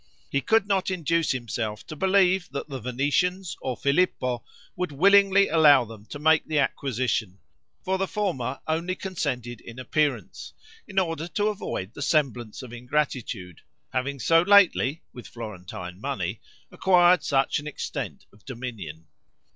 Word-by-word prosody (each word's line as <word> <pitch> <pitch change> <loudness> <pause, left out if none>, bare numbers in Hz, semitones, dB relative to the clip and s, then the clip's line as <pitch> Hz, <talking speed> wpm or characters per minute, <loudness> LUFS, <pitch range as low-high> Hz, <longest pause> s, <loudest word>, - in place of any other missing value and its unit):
He 140 - +1
could 220 +3 +3
not 195 -2 +1
induce 165 -2 0
himself 115 -4 -3
to 155 - -8
believe 190 +1 +3
that 140 - -5
the 135 -3 -6
Venetians, 145 - 0
or 130 -2 -3
Filippo, 140 -5 +1 0.3
would 180 -3 -2
willingly 195 +5 +5
allow 150 -5 +6
them 110 -1 -12
to - - -7
make 155 +1 +4
the 155 - -1
acquisition; 125 -8 -1 0.5
for 190 0 -1
the 195 - 0
former 140 - -2
only 165 +3 -1
consented 130 - -4
in 115 +1 -11
appearance, 130 - -2 0.3
in 195 - -11
order 165 -3 0
to 205 +4 0
avoid 115 - -4
the - - -9
semblance 130 -7 0
of 120 -2 -10
ingratitude, 120 - -3 0.3
having 135 +2 -1
so 165 +7 +4
lately, 175 -6 +4
with 125 - -10
Florentine 90 -4 -8
money, 105 -7 -3 0.3
acquired 180 -2 +4
such 135 0 +1
an 150 - -8
extent 150 - -5
of 100 0 -22
dominion. 110 - -7
140 Hz, 145 wpm, -26 LUFS, 120-180 Hz, 0.5 s, allow